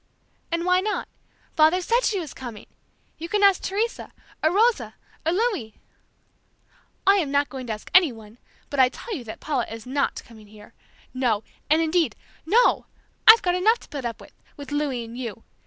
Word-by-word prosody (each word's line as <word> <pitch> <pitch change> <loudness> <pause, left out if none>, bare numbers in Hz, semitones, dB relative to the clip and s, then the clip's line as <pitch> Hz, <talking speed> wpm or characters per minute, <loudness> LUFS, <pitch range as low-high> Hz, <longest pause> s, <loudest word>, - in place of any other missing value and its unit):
"And 335 +1 -1
why 365 0 +4
not? 420 +2 -2 0.5
Father 315 +3 +5
said 465 +7 +1
she 405 -4 +1
was 320 -5 -7
coming! 240 -5 -9 0.5
You 335 +1 -6
can 415 +1 +1
ask 395 -2 +5
Teresa, 430 +4 -2 0.3
or 315 - +3
Rosa, 445 +5 +2 0.3
or - - +3
Louis!" 375 - -1 1.3
"I 395 +1 +6
am 325 -8 0
not 285 +1 +1
going 260 -2 -7
to 220 - -2
ask 210 - -10
anyone, 235 - +2 0.3
but 285 - -2
I 255 -1 +6
tell 445 - -7
you 265 - -6
that 220 - -8
Paula 275 -6 -1
is 225 +1 -8
not 275 +2 -1
coming 220 -2 -15
here! 210 0 -16 0.4
No! 240 -5 0 0.3
and 315 +2 +4
indeed, 325 +1 +1 0.3
NO! 480 +8 +3 0.4
I've 445 +1 +10
got 355 - +2
enough 425 +6 +3
to - - -16
put 280 -3 -6
up 230 -1 -4
with, - - -15 0.2
with 285 -2 -9
Louis 290 -5 -1
and 230 +1 -10
you! 230 -3 -6
300 Hz, 185 wpm, -24 LUFS, 245-375 Hz, 1.3 s, I've